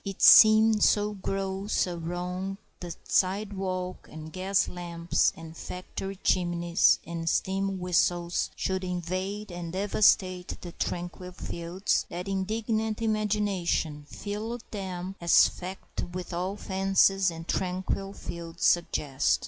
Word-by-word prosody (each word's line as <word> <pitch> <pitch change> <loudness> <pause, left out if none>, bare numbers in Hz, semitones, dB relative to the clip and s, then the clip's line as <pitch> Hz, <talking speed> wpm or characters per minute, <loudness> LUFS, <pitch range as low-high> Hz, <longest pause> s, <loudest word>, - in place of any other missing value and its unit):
It 195 -1 -6
seemed 215 0 +8
so 210 0 +3
gross 195 0 -1
a 180 -1 -4
wrong 180 +3 -4 0.2
that 175 -1 -9
sidewalks 190 -1 -1
and 155 0 -9
gas 190 +1 +1
lamps 170 -1 0
and 165 0 -10
factory 190 +3 -6
chimneys 175 -1 +2
and 165 0 -3
steam 195 +1 0
whistles 175 -1 +1
should 190 0 -2
invade 185 +3 -3
and 175 -1 -6
devastate 185 -1 +2
the 175 - -7
tranquil 175 +2 -4
fields 175 +3 -2
that 180 +2 -5
indignant 215 +3 -1
imagination 205 -8 0
filled 220 +3 -5
them 190 -2 -5
as 170 -1 +6
fact 185 +1 -7
with 180 +1 -6
all 185 +3 -2
the - - -12
fancies 195 0 +3
that 165 -1 -3
tranquil 190 +1 -2
fields 170 -3 -6
suggest. 135 - +2
185 Hz, 120 wpm, -28 LUFS, 175-195 Hz, 0.2 s, seemed